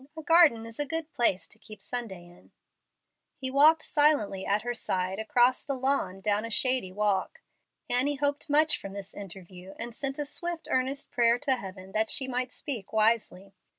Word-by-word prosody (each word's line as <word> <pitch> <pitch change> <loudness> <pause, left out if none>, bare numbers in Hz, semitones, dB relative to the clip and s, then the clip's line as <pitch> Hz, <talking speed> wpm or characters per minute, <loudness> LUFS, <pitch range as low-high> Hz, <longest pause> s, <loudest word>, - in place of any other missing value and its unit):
"A 315 - -7
garden 305 -8 +5
is 230 +2 -11
a 290 - 0
good 325 0 -4
place 235 -9 +1
to 220 - -8
keep 215 -1 -10
Sunday 220 -8 -4
in." 175 0 -19 0.9
He 260 -1 -3
walked 310 +3 +5
silently 285 -11 +2
at 205 +1 +1
her 240 0 -2
side 185 -4 -2
across 245 +2 +2
the 275 - -3
lawn 255 -8 -1
down 210 +1 +1
a 230 - -5
shady 255 -4 +2
walk. 205 - -1 0.4
Annie 265 +4 +1
hoped 285 +1 -1
much 305 +2 +4
from 195 - -8
this 200 -1 -6
interview, 190 -1 -10
and 235 +1 -6
sent 270 +3 -4
a 295 - -3
swift, 335 +2 -4
earnest 265 +2 -1
prayer 235 -1 +3
to 270 0 0
Heaven 190 -4 -9
that 220 +2 0
she 265 - +1
might 250 0 -2
speak 245 -10 -5
wisely. 215 -3 +1
240 Hz, 185 wpm, -28 LUFS, 200-280 Hz, 0.9 s, garden